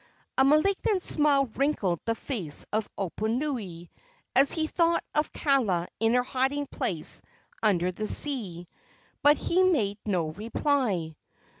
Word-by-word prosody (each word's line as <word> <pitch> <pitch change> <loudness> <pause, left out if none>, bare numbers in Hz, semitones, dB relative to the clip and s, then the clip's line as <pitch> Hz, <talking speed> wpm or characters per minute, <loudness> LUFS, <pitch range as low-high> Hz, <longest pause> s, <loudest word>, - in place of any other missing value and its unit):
A 265 - +4
malignant 370 +7 +3
smile 290 -3 +3
wrinkled 225 - 0
the 230 - 0
face 200 - -3
of 215 0 0
Oponui, 215 - -3 0.5
as 275 +1 +5
he 320 -1 0
thought 335 +1 +1
of 300 0 0
Kaala 225 - +1
in 225 +2 +3
her 250 - +3
hiding 270 +3 -1
place - - -3 0.4
under 185 -5 +2
the 215 +4 -4
sea, 205 - -2 0.6
but 295 +1 +6
he 360 +2 +1
made 230 - +2
no 175 -6 0
reply. 210 - -1
245 Hz, 130 wpm, -27 LUFS, 195-290 Hz, 0.6 s, but